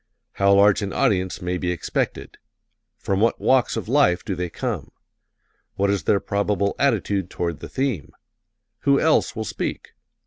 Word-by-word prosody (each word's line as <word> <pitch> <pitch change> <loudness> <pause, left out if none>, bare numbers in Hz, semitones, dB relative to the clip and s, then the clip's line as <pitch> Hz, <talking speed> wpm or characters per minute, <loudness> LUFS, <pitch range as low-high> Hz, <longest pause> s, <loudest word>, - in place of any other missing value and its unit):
How 100 0 +2
large 100 +1 +5
an 100 -1 -3
audience 95 -1 0
may 90 0 -2
be 90 - -2
expected? 90 - -3 0.6
From 95 -1 -1
what 115 - +2
walks 130 -2 +2
of - - -4
life 120 -9 +3
do 95 - -2
they 90 -1 -3
come? - - -4 0.9
What 100 0 +1
is 100 - -2
their 100 - +3
probable 100 0 -1
attitude 100 -8 +1
toward 85 -3 -3
the - - -8
theme? 110 - -2 0.7
Who 140 -1 +3
else 160 -5 +2
will 110 -1 -3
speak? - - -5
100 Hz, 160 wpm, -23 LUFS, 90-110 Hz, 0.9 s, large